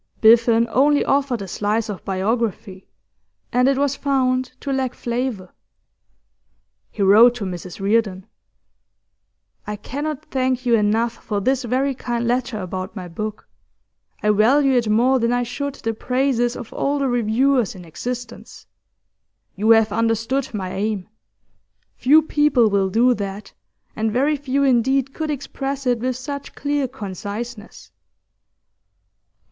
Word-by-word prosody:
Biffen 230 +1 +5
only 285 +2 +3
offered 270 -6 0
a - - -7
slice 210 +4 -1
of 205 -4 -6
biography, 195 -1 -2 0.7
and 250 +1 +3
it 275 -1 +2
was 280 0 +1
found 260 -2 +1
to 275 - -3
lack 265 -2 -1
flavour. 235 -6 -3 1.4
He 200 - -3
wrote 225 +5 +7
to 220 -5 -4
Mrs 180 -1 -7
Reardon: 200 -2 0 1.4
'I 210 - -3
cannot 285 +7 -5
thank 255 -1 0
you 240 - +2
enough 225 +2 +1
for 205 -2 -2
this 260 +5 0
very 265 +4 0
kind 240 -2 -3
letter 245 -2 -1
about 185 +2 -5
my 185 -3 -6
book; 215 +5 -6 0.8
I 210 - +4
value 265 +7 +4
it 240 -4 +1
more 250 +5 +3
than 235 0 +1
I 245 0 +1
should 275 +4 -4
the 225 - -3
praises 250 0 0
of 230 - -8
all 285 +1 0
the 275 -1 0
reviewers 245 0 +1
in 180 -2 -11
existence. 240 +8 -7 0.9
You 210 +3 0
have 225 -1 +5
understood 230 +4 0
my 190 -4 -4
aim. 205 -1 -2 0.9
Few 305 +5 +5
people 295 -8 +3
will 195 -1 +2
do 240 +6 +3
that, 200 -2 -6 0.4
and 220 0 -1
very 275 +6 +2
few 280 -1 -1
indeed 265 +1 +2
could 315 -1 -4
express 275 -1 -4
it 245 -2 +1
with 255 +2 -1
such 280 +2 -7
clear 285 -2 -1
conciseness. 210 - -7
240 Hz, 140 wpm, -21 LUFS, 210-265 Hz, 1.4 s, wrote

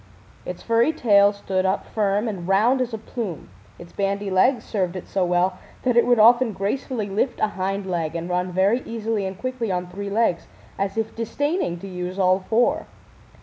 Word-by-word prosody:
Its - - -6
furry 230 +5 +3
tail 205 -9 +4
stood 190 -2 -2
up 190 +1 0
firm 205 +1 0
and 185 -5 -4
round 225 +7 +3
as 250 -1 -1
a 220 - -3
plume, 210 - -6 0.3
its 175 0 -13
bandy 200 0 -1
legs 240 +8 +3
served 185 -4 -2
it 185 - -7
so 195 - 0
well 180 +1 +1 0.2
that 250 -2 +2
it 235 - +4
would 245 -1 +4
often 235 +1 +5
gracefully 215 +3 -2
lift 210 +6 -1
a 215 - +2
hind 195 0 -3
leg 170 -4 -2
and 170 0 -3
run 180 0 -1
very 195 +7 +2
easily 225 -3 -2
and 190 0 -6
quickly 255 -3 -3
on 180 0 -1
three 200 +3 -6
legs, 200 -5 +1 0.3
as 195 +1 -2
if 225 0 -2
disdaining 285 - -1
to 195 - -9
use 180 0 -5
all 185 -1 +3
four. 225 +5 +1
200 Hz, 190 wpm, -23 LUFS, 185-230 Hz, 0.3 s, often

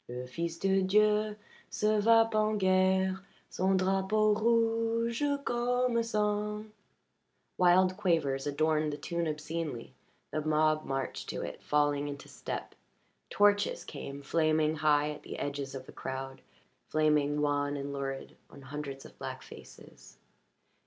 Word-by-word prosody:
"Le 125 +1 -5
fils 165 +6 -4
de 195 +1 +2
Dieu 210 +2 +3 0.3
se 215 0 +1
va 225 +1 +5
Pen 215 0 +1
guerre 190 0 +2 0.3
Son 190 +1 +2
drapeau 195 +3 +2
rouge 230 +2 +1 0.2
comme 245 0 +1
sang." 210 -1 -1 0.9
Wild 185 +1 +5
quavers 155 -8 0
adorned 155 +1 +1
the 145 - -5
tune 170 +3 -2
obscenely; 155 -4 -4 0.4
the 155 - -1
mob 155 0 +2
marched 135 -1 -3
to - - -3
it, - - -7
falling 145 -1 +1
into 140 -1 -7
step. - - -6 0.6
Torches 205 0 +2
came, 140 -1 -8
flaming 155 +1 +1
high 150 0 +3
at 150 - -8
the - - -8
edges 140 -1 -4
of 130 -1 -7
the - - -12
crowd, 135 0 -6 0.5
flaming 150 -1 +2
wan 145 -1 0
and 140 0 -5
lurid 135 -1 -5
on 140 - -14
hundreds 140 0 -6
of - - -15
black - - -6
faces. - - -14
165 Hz, 130 wpm, -31 LUFS, 145-210 Hz, 0.9 s, va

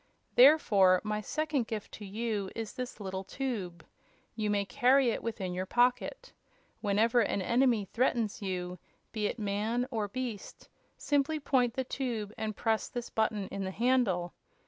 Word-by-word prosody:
Therefore, 205 -10 +6
my 210 0 -2
second 295 0 -1
gift 215 -2 -5
to 210 - -9
you 210 -1 -2
is 225 -2 -5
this 250 -3 -6
little 190 -1 -4
tube. 190 - -4 0.5
You 215 -2 -1
may 200 -1 +1
carry 260 +2 +4
it - - -3
within 200 -6 -3
your 185 +1 -3
pocket. 250 - +1 0.5
Whenever 220 +4 +2
an 215 - +1
enemy 235 -1 +2
threatens 230 0 0
you, 180 -2 -4 0.3
be 215 -2 -1
it - - -4
man 215 +3 -1
or 220 -4 -1
beast, 235 -1 -6 0.3
simply 290 +2 +1
point 255 -4 +1
the 260 - 0
tube 235 -6 -3
and 215 -1 -3
press 225 0 0
this 245 -1 -6
button 215 -3 0
in 195 - -4
the 190 - -2
handle. 200 -6 +1
220 Hz, 155 wpm, -31 LUFS, 200-250 Hz, 0.5 s, Therefore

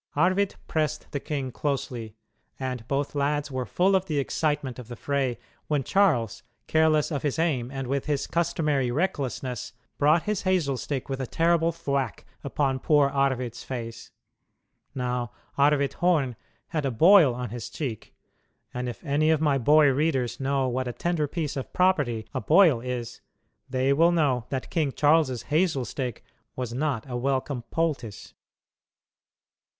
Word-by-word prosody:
Arvid 185 +6 +2
pressed 155 -1 -2
the 140 - -2
king 135 -3 -3
closely, 120 -4 -3 0.4
and 125 -3 -4
both 140 +1 -1
lads 145 +1 0
were 130 -1 -3
full 190 +2 +2
of 190 0 +1
the 150 - -1
excitement 140 -2 -1
of 125 - -9
the 120 - -7
fray 135 -1 -1 0.3
when 145 -3 0
Charles, 120 - +2 0.2
careless 155 0 +3
of 145 -3 -1
his 145 -1 -1
aim 145 -8 0
and 135 0 -4
with 135 +2 -2
his 145 -2 0
customary 155 -6 0
recklessness, 130 - -2 0.3
brought 155 +3 +4
his 210 -2 -1
hazel 180 -8 +1
stick 135 +1 -4
with 135 -1 -3
a 130 - -3
terrible 165 +2 +2
thwack 140 - -2 0.2
upon 135 -3 0
poor 145 0 +3
Arvid's 130 -4 -1
face. 115 -3 -6 0.9
Now 125 -3 -2 0.2
Arvid 140 0 +3
Horn 155 -9 +1 0.3
had 155 -2 -1
a 135 - +1
boil 160 - +6
on 125 -2 -5
his 120 -2 -6
cheek, 125 -9 -6 0.6
and 125 0 -3
if 120 - -9
any 150 +2 +2
of 160 -2 +3
my 145 -3 +2
boy 150 +4 +5
readers 135 -3 0
know 135 -1 0
what 130 +1 -2
a 120 - -3
tender 170 -1 -1
piece 155 -1 -3
of 135 - -5
property 145 -12 +2
a 130 - -2
boil 160 -6 +5
is, 125 -2 -5 0.5
they 130 +1 +2
will 165 +4 +4
know 140 -8 +1
that 130 -2 -4
King 150 -5 0
Charles's 145 -5 +3
hazel 155 -6 +2
stick 125 0 -4 0.3
was 125 -2 -4
not 135 -3 -1
a 125 - -5
welcome 130 +1 -1
poultice. 145 -10 -3
140 Hz, 155 wpm, -26 LUFS, 125-155 Hz, 0.9 s, boil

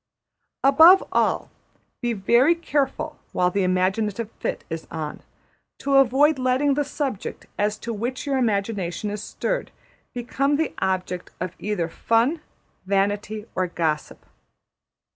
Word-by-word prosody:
Above 320 +8 +8
all, - - +1 0.5
be 240 -1 0
very 235 - +4
careful, 310 -1 -2
while 180 0 +2
the 200 - 0
imaginative 195 +4 0
fit - - -3
is 160 -1 -6
on, 155 -2 -5 0.6
to 275 -1 +2
avoid 275 +3 +4
letting 255 +3 +2
the 290 +1 +1
subject 275 -7 -4
as 210 +1 +1
to 235 +2 -5
which 240 +6 -3
your 275 -2 0
imagination 205 -4 -1
is 210 0 -4
stirred - - -3 0.5
become 275 +4 0
the 315 +1 -1
object 185 -1 -2
of 185 0 -3
either 205 -5 -1
fun, 230 - +1 0.4
vanity, 205 +2 -1
or 185 -1 0
gossip. 160 -3 -2
225 Hz, 125 wpm, -24 LUFS, 190-275 Hz, 0.6 s, Above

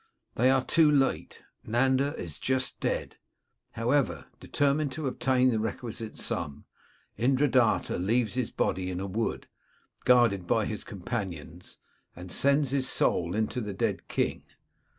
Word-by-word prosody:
They 125 +3 +3
are 130 -1 +2
too 160 -2 +4
late: 140 -2 0 0.2
Nanda 130 +5 +1
is 80 -4 -7
just 130 0 -1
dead. - - -2 0.6
However, 115 - 0
determined 145 0 0
to 155 +1 -5
obtain 130 0 +2
the 110 - 0
requisite 110 +1 -5
sum, 70 0 -4 0.5
Indradatta 130 -4 +2
leaves 115 +2 +1
his 125 -2 -1
body 90 +2 -1
in 90 -1 -3
a 95 - -3
wood, 110 +4 -3 0.6
guarded 115 -8 +4
by 110 +2 +2
his 110 - -4
companions, 90 -5 -6 0.4
and 90 +1 -9
sends 140 -1 +2
his 135 -2 +1
soul 85 +2 +1
into 110 +3 -1
the 105 -3 -5
dead - - -2
king. - - -1
120 Hz, 135 wpm, -28 LUFS, 100-130 Hz, 0.6 s, too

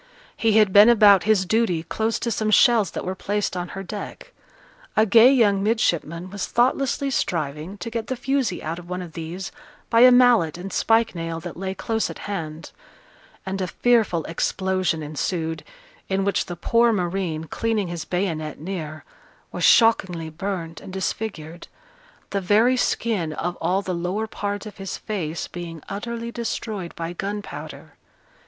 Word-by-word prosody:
He 225 -1 +2
had 210 -3 +4
been 205 +3 +9
about 205 -5 +6
his 210 -3 +3
duty 185 -5 +1
close 220 +5 -1
to 235 - -1
some 215 0 0
shells 225 -1 +5
that - - -6
were 185 - -2
placed 205 +1 -2
on 175 0 -3
her 195 - -4
deck; 210 - -8 0.7
a 215 - +6
gay 225 +4 +7
young 210 -7 +3
midshipman 185 -5 0
was 205 -2 -4
thoughtlessly 270 +3 +1
striving 160 - -2
to 230 - -6
get 230 -1 -3
the 260 - -2
fusee 255 -5 -1
out 165 +2 -4
of 175 0 -13
one 180 0 -3
of 170 -3 -11
these 170 +4 -6 0.4
by 230 - +5
a 250 +1 +9
mallet 240 -11 +5
and 185 +2 -7
spike 225 0 +2
nail 165 -1 -4
that - - -7
lay 190 +1 -4
close 225 +1 -1
at - - -7
hand; 165 -6 -5 0.7
and 190 0 -3
a 185 - -1
fearful 220 -6 +2
explosion 185 -1 -1
ensued, 160 +2 -3 0.5
in 195 0 0
which 200 - 0
the 175 - -5
poor 230 +7 +3
marine, 175 -5 -2
cleaning 215 +4 -1
his 170 -2 -4
bayonet 165 -5 -3
near, 155 -2 -6 0.5
was - - -4
shockingly 180 -8 +4
burnt 170 -1 -5
and - - -10
disfigured, 180 -4 -4 0.6
the 200 - -1
very 215 +7 +4
skin 210 -9 0
of 175 +3 -3
all 185 +4 0
the 185 - -3
lower 180 +5 -2
part 205 -1 -4
of 210 - -10
his 195 -1 -5
face 170 -7 -4
being 170 -2 -7
utterly 235 +3 -5
destroyed 220 -6 -4
by 170 +1 -4
gunpowder. 205 +3 -6
195 Hz, 165 wpm, -23 LUFS, 170-220 Hz, 0.7 s, been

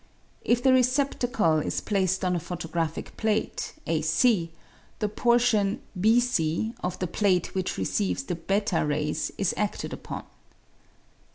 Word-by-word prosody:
If 240 +1 +2
the 265 -1 +5
receptacle 250 - +2
is - - -1
placed 190 -2 0
on 180 0 +1
a - - 0
photographic 165 -1 -4
plate, 220 -1 -1
a 160 -1 0
c, 165 +3 +2 0.5
the 210 - 0
portion, 225 -2 +2 0.2
B 220 +4 +5
c, 220 -3 0
of 180 - -2
the 185 - -2
plate 180 0 +1
which 185 -1 -2
receives 95 +1 -1
the 175 - -3
fl 195 +2 0
rays 150 0 -1
is 195 - +1
adted 210 -1 -2
upon. - - -6
190 Hz, 135 wpm, -26 LUFS, 165-225 Hz, 0.5 s, the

